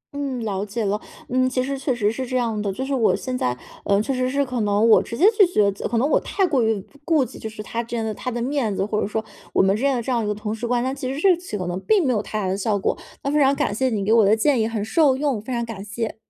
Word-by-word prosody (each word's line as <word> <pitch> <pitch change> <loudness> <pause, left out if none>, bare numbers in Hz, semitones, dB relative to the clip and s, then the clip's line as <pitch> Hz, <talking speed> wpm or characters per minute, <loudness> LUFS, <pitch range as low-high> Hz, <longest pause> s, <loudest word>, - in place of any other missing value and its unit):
嗯， 275 -3 -3
了 195 -2 -2
解 210 +1 -3
了， 205 +2 -1 0.3
嗯， 255 +1 +2
其 255 0 0
实 275 +1 -3
确 270 0 -1
实 210 -2 +1
是 260 +3 -4
这 255 +1 -1
样 225 -3 -1
的。 200 -2 -1
就 260 +7 -4
是 280 - -2
我 240 -5 +3
现 255 -1 -4
在， 125 - -1 0.3
呃， 200 0 +2
确 265 +6 -1
实 255 0 0
是 280 +1 +1
可 250 -2 -3
能 205 +2 +2
我 220 - +7
直 230 - -6
接 345 - +4
拒 410 - +7
绝 210 - +2
则 195 - -4
可 230 - -1
能 265 +5 +2
我 - - +3
太 390 - 0
过 280 -7 +1
于 220 -2 +1 0.2
顾 310 -4 +2
忌 - - -11
就 220 - -5
是 210 -1 -8
他 230 +2 -3
真 230 -1 -3
的 220 - -2
他 250 - -5
的 240 -1 -3
面 245 -4 -1
子， 195 - 0
或 210 0 -1
者 - - -1
说 220 +1 -2 0.3
我 - - +4
们 195 +1 +3
认 270 +4 +1
了 240 - -1
这 255 - -3
样 235 -2 +1
一 - - -2
个 210 - -1
同 210 0 -4
事 225 +2 -4
关 245 0 +1
那 260 - -1
其 265 -2 -4
实 275 - -4
这 385 +2 +5
一 - - -2
起 350 - -6
可 185 - -4
能 175 +1 -3
并 415 -6 +3
没 255 - +2
有 210 - 0
太 215 - -4
大 195 - -1
的 185 - 0
效 205 +1 0
果。 195 - 0 0.3
那 280 - -1
非 300 - +2
常 275 0 +4
感 205 - 0
谢 260 +4 +1
你 210 -4 -2
给 215 - +3
我 230 -2 +6
的 205 +2 +5
建 250 +1 +2
议， 220 - +1
很 220 -2 -3
受 275 +2 +3
用， 275 -6 -1
非 225 - -8
常 235 -1 -1
感 220 -4 -7
谢。 215 +1 -4
235 Hz, 350 characters per minute, -22 LUFS, 210-265 Hz, 0.3 s, 我